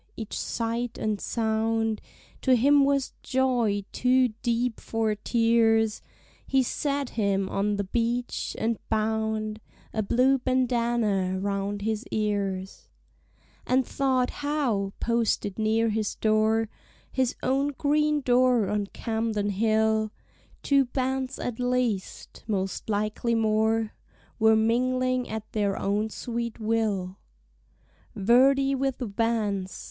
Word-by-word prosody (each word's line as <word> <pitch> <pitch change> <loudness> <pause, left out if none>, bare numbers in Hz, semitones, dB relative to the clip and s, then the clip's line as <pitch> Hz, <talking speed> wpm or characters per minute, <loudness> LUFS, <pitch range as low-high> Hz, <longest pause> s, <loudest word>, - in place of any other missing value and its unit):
Each 220 -2 -5
sight 230 +1 -2
and 215 -2 -2
sound 225 -1 0 0.4
To 260 -1 +4
him 280 +4 +5
was 275 -1 0
joy 240 -6 +1
too 255 0 +3
deep 240 -1 0
for 225 -1 -1
tears; 225 0 +2 0.5
He 265 -1 +3
sat 280 +1 -2
him 200 -3 0
on 205 +2 0
the 200 - -1
beach, 235 +4 -2
and 225 0 -1
bound 220 0 -1 0.3
A 220 - 0
blue 255 +6 +3
bandana 235 -7 +1
round 200 +1 -2
his 220 +1 -1
ears: 200 -3 -2 0.8
And 255 0 +3
thought 260 -2 0
how, 265 -10 0
posted 230 -3 0
near 220 +1 +2
his 215 -1 -1
door, 220 +1 +2 0.4
His 260 -2 0
own 270 +2 +1
green 300 +1 +2
door 250 -4 +3
on 205 -1 -1
Camden 220 -2 -2
Hill, 220 +1 +2 0.5
Two 275 -1 +4
bands 260 +1 -2
at 245 -1 -4
least, 245 -5 -2
most 195 -1 -2
likely 215 +3 0
more, 220 0 +1 0.5
Were 220 0 +5
mingling 255 +3 +1
at 220 0 -6
their 205 -2 0
own 205 +2 0
sweet 235 +1 -4
will 215 -4 -1 1.0
Verdi 270 +6 +4
with 270 -1 -1
Vance. 210 -4 -1
225 Hz, 115 wpm, -26 LUFS, 215-250 Hz, 1.0 s, him